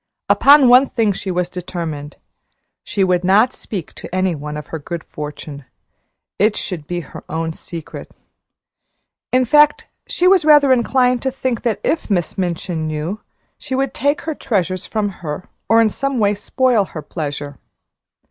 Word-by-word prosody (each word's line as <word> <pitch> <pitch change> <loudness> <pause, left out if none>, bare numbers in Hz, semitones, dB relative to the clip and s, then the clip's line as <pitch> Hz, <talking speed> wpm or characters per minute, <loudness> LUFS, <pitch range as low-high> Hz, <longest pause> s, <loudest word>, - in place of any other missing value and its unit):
Upon 280 -1 +7
one 250 +2 +6
thing 225 -3 +1
she 195 0 -5
was 180 -1 0
determined. 165 -5 -6 0.7
She 200 - 0
would 180 -1 +2
not 210 +7 +4
speak 190 -7 -7
to - - -10
any 185 -1 +1
one 150 0 -6
of 150 - -7
her 160 - -2
good 170 +3 -6
fortune 150 -1 -8 0.8
it 210 +1 +3
should 165 -6 -5
be 175 +1 -3
her 155 - -11
own 160 0 -2
secret; 165 -1 -9 1.2
in 255 0 +3
fact, 295 +4 +4 0.2
she 360 - +1
was 375 -2 +5
rather 295 -3 +6
inclined 250 0 +2
to 265 - 0
think 260 -2 -2
that 225 -5 -1
if 320 - -1
Miss 175 -5 0
Minchin 175 -3 -2
knew, 155 +7 -3 0.4
she 265 -3 -4
would 270 -1 -1
take 285 +2 0
her 320 - -3
treasures 190 - -2
from 215 -2 -1
her 155 +2 -5 0.2
or 225 - +6
in 225 -1 +4
some 275 +2 -2
way 205 -2 +3
spoil 240 +2 +1
her 155 -4 -8
pleasure. 145 -2 -5
195 Hz, 165 wpm, -19 LUFS, 165-255 Hz, 1.2 s, Upon